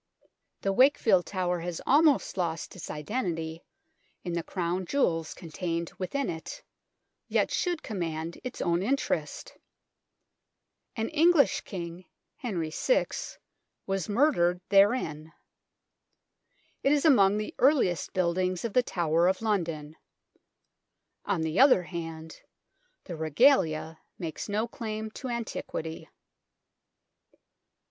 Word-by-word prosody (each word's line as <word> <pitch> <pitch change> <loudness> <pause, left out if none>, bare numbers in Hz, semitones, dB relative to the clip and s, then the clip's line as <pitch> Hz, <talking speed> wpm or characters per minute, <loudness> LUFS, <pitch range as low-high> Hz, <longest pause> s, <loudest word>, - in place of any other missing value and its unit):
The 195 - 0
Wakefield 225 -7 +4
Tower 180 -2 -1
has 170 0 -4
almost 295 0 +4
lost 165 -2 -3
its 180 - -8
identity 165 -2 -3 0.6
in 175 - -4
the 170 - 0
Crown 180 +1 -2
Jewels 165 - 0
contained 170 0 -4
within 270 +9 -2
it, 160 0 -6 0.6
yet - - +1
should 350 -3 -1
command 170 -6 -4
its 255 -1 -6
own 170 0 +1
interest. 265 +8 -2 1.4
An 225 -1 -1
English 325 -1 +4
King, 175 -1 -7 0.3
Henry 175 -10 -3
VI, - - +2 0.8
was 195 -2 -2
murdered 205 - +3
therein. 195 -7 +2 1.5
It 275 - +2
is 295 +1 +2
among 205 -9 +5
the 215 - -4
earliest 255 - +3
buildings 185 +1 0
of 225 - -3
the 250 - +5
Tower 170 -6 +1
of 190 0 +1
London. 165 -8 -2 1.3
On 195 -5 0
the 160 +1 -1
other 260 -9 +6
hand, 165 -2 -7 0.6
the 175 - -7
Regalia 160 - +2 0.2
makes 165 +2 -5
no 215 +3 0
claim 220 -1 -5
to 260 - -7
antiquity. 225 -9 -5
185 Hz, 110 wpm, -28 LUFS, 165-235 Hz, 1.5 s, other